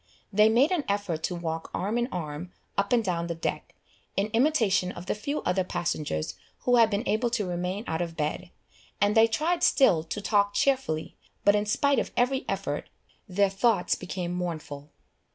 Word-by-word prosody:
They 210 +2 +6
made 250 +8 +4
an 350 -5 +1
effort 200 -6 -1
to 180 - -3
walk 165 -1 -4
arm 205 +5 -1
in 240 - 0
arm 165 0 -5 0.2
up 200 0 0
and 240 -2 +4
down 170 -4 -1
the 170 - -3
deck, 165 - -4 0.4
in 200 +2 +1
imitation 225 -8 +2
of 175 - -9
the - - 0
few 285 +8 -3
other 185 +1 +1
passengers 155 - -2 0.3
who 245 -1 +3
had 230 -2 +6
been 210 +3 -2
able 225 +3 +1
to 230 -3 -1
remain 180 +3 -2
out 160 +1 -2
of 170 -1 -4
bed, 155 +4 -2 0.5
and 205 +1 +2
they 225 0 +7
tried 320 +10 0
still 175 - +4
to 165 +6 -4
talk 205 -1 +1
cheerfully, 255 - 0 0.3
but 205 - +7
in 210 0 +1
spite 280 +6 +2
of - - -3
every 260 +2 +1
effort, - - -3 0.4
their 195 +1 +2
thoughts 195 -2 +2
became 180 -1 -4
mournful. 155 -5 -5
200 Hz, 185 wpm, -27 LUFS, 175-225 Hz, 0.5 s, they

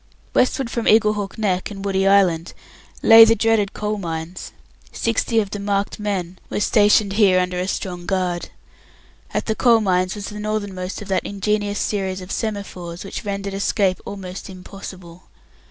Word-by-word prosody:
Westward 255 -1 +1
from 235 0 -2
Eaglehawk 210 -2 +3
Neck 190 -4 0
and 200 -1 -7
Woody 195 -1 +1
Island 185 -4 +3 0.5
lay 225 0 +10
the 225 0 +5
dreaded 225 -2 +1
Coal 210 0 -3
Mines. 165 0 -5 0.4
Sixty 230 0 0
of 205 -2 -2
the 205 - -4
"marked 200 +1 -1
men" 190 -4 -3
were - - -2
stationed 210 -1 +3
here 195 -3 +4
under 180 0 -1
a 180 - -2
strong 180 -3 -4
guard. 180 -2 -1 0.8
At - - -2
the 220 - 0
Coal 230 0 +4
Mines 185 -2 +1
was 205 -1 -6
the 210 - -8
northernmost 205 -2 -4
of - - -13
that 190 - +1
ingenious 205 +1 -1
series 190 -3 -2
of 185 +1 -9
semaphores 190 -6 -4
which 195 - -6
rendered 200 -1 -4
escape 195 -1 0
almost 190 -2 -7
impossible. 185 -2 -10
200 Hz, 160 wpm, -21 LUFS, 185-210 Hz, 0.8 s, lay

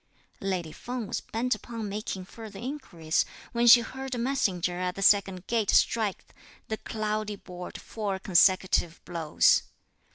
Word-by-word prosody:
Lady 185 -5 -2
Feng 245 +6 -5
was - - -3
bent 245 +3 -1
upon 230 -3 -6
making 200 -2 -4
further 215 0 -10
inquiries, 195 - -2 0.3
when 235 0 +2
she 240 +1 +10
heard 265 +2 -5
a - - -4
messenger 190 -9 0
at 180 0 -2
the 195 - -6
second 195 -2 +3
gate 225 -4 0
strike 215 -4 +2 0.4
the 220 - -2
"cloudy 215 -1 -3
board" 180 -2 -9
four 205 -3 -3
consecutive 185 -2 +3
blows. 165 -3 +3
205 Hz, 140 wpm, -28 LUFS, 185-230 Hz, 0.4 s, she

